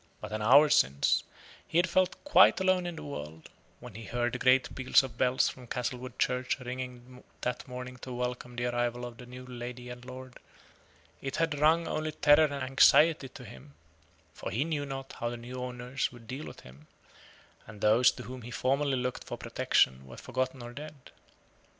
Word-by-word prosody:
But - - -8
an 110 0 -3
hour 140 +8 +7
since, 70 - +3 0.5
he - - -1
had 175 +1 +4
felt 185 +1 +2
quite 290 - +6
alone 185 -1 +2
in 175 - -5
the - - -8
world: 80 - -8 0.3
when 125 -3 -11
he 110 +2 -9
heard 120 0 -1
the 125 - -3
great 130 +1 +3
peal 130 -1 -7
of 130 -4 -7
bells 125 +2 +2
from 125 -2 -7
Castlewood 125 +1 -4
church 125 +1 0
ringing 125 0 -7 0.2
that 125 0 -3
morning 125 0 -7
to 130 - -9
welcome 125 0 -4
the 120 +1 -2
arrival 120 0 -1
of 120 -1 -9
the 125 - -11
new 125 +1 -10
lord 125 0 -7
and 125 0 -9
lady, 130 0 -10 0.8
it 135 -1 -4
had 160 -3 0
rung 160 +3 +4
only 155 0 -2
terror 150 +2 +5
and 145 - -3
anxiety 135 +2 +5
to 125 0 -12
him, 70 - -13 0.6
for - - -6
he 120 +6 0
knew 150 -3 -2
not 135 0 -6
how 120 - -1
the 120 - -5
new 125 +2 -7
owner 125 0 -7 0.2
would 120 -2 -14
deal 135 +5 -6
with - - -11
him; 65 +4 -16 0.8
and 105 -1 -11
those 110 +4 +5
to - - -6
whom 130 0 -8
he 120 - -9
formerly 135 +3 0
looked 125 0 -3
for - - -6
protection 65 +1 +1
were 65 - -11
forgotten 130 0 -3
or 120 0 -8
dead. 150 +3 -8
125 Hz, 195 wpm, -30 LUFS, 120-135 Hz, 0.8 s, hour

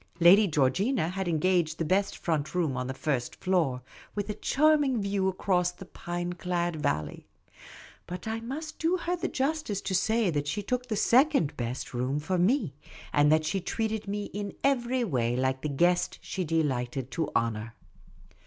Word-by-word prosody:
Lady 190 +5 +7
Georgina 165 - +1
had 190 0 -3
engaged 170 -1 +1
the 165 - -1
best 195 +5 +1
front 155 -1 -2
room 160 -7 +1
on 125 0 -2
the 130 - -3
first 130 -4 -2
floor, 160 -9 0 0.3
with 205 0 -2
a - - -3
charming 290 +2 +2
view 200 -1 0
across 185 -1 +1
the 180 +2 -12
pine 175 0 -4
clad 175 -1 -1
valley; 75 - -2 0.8
but 180 +4 -6
I 220 +1 -2
must 295 +7 -6
do 335 +3 +2
her 350 0 -1
the 345 - -2
justice 270 -7 -1
to 190 - -3
say 220 +1 +2
that 145 -2 -1
she 185 +8 -2
took 250 +4 -2
the 220 - -1
second 250 - +3
best 120 +1 -4
for 145 +8 -1
me, 195 - +2 0.4
and 145 +1 +4
that 155 0 +3
she 195 +4 -1
treated 220 +2 -2
me 205 +1 -2
in 205 -1 -4
every 255 -2 +2
way 120 - 0
like 130 +1 0
the 150 - -2
guest 175 +5 +2
she 190 - -3
de 165 0 +2
lighted 130 -1 -2
to 165 -2 -1
honour. 115 0 -1
180 Hz, 175 wpm, -28 LUFS, 145-215 Hz, 0.8 s, Lady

